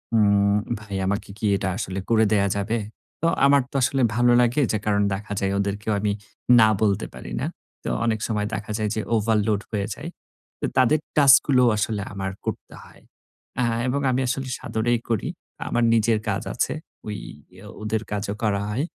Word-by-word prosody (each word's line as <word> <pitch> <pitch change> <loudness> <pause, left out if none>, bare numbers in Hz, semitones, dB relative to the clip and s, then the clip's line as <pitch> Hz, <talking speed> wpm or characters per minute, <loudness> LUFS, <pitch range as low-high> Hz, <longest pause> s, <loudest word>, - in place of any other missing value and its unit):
উম 100 -2 +4 0.3
"ভাই 100 -2 -7
আমাকে 100 +1 -2
কি 110 - -4
এটা 95 - -2
আসলে 95 -3 -3
করে 110 -1 +4
দেয়া 100 -1 +3
যাবে?" 105 +4 -1 0.4
তো 165 - +2 0.2
আমার 140 0 +5
তো - - -15
আসলে 135 +1 +1
ভালো 120 +1 +4
লাগে 120 +4 +2
যে 110 - +1
কারণ 105 -1 +2
দেখা 105 +2 -5
যায় 95 0 0
ওদেরকেও 100 +2 -2
আমি 105 0 0 0.5
না 110 - +7
বলতে 100 -3 +2
পারি - - -9
না। - - -1 0.4
তো - - -3 0.2
অনেক 110 -2 +1
সময় 105 -2 -1
দেখা 105 -1 -4
যায় 110 -1 -1
যে 110 - -1
ওভারলোড 105 -1 +1
হয়ে 105 -2 -1
যায়। 155 +3 -7 0.5
অ - - +3
তাদের 130 +4 +4 0.2
টাস্ক 140 -2 +8
গুলো 130 -3 +4
আসলে 105 0 -1
আমার 95 -1 -3
করতে - - -5
হয়। - - -18 0.6
আ - - +2 0.2
এবং 140 +3 0
আমি 130 +1 +1
আসলে 130 +1 -2
সাদরেই 120 +1 0
করি। 115 -3 0 0.4
আমার 120 - +1
নিজের 110 0 +3
কাজ 100 -2 -1
আছে। - - 0 0.3
ওই 105 -1 -3 0.5
অ - - -10
ওদের 110 0 -1
কাজও 100 0 -2
করা 100 -2 +1
হয়। 125 +8 -1
110 Hz, 185 wpm, -24 LUFS, 100-120 Hz, 0.6 s, টাস্ক